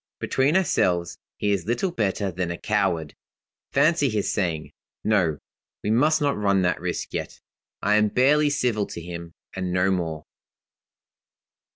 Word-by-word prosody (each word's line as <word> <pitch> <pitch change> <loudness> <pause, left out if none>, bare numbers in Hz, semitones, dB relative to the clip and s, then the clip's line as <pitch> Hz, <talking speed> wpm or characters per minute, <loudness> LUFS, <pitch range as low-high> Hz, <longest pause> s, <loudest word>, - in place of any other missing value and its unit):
Between 140 +6 +2
ourselves, 85 - +1 0.2
he 105 - 0
is 95 -3 -1
little 120 +11 0
better 100 - -1
than 90 0 -3
a 85 - -4
coward. 95 -7 0 0.6
Fancy 145 0 +3
his 105 -3 -1
saying; 80 -7 -2 0.3
'No; 90 -8 +2 0.5
we 105 - 0
must 150 +7 +3
not 145 -1 +2
run 100 -2 +2
that 90 0 0
risk - - -3
yet.' - - -4 0.4
I 105 +1 +4
am 105 0 +4
barely 145 +7 +3
civil 125 -8 0
to - - -7
him, 85 0 -8 0.2
and 95 -1 -2
no 90 +2 +2
more. 80 -4 -2
100 Hz, 150 wpm, -24 LUFS, 85-125 Hz, 0.6 s, I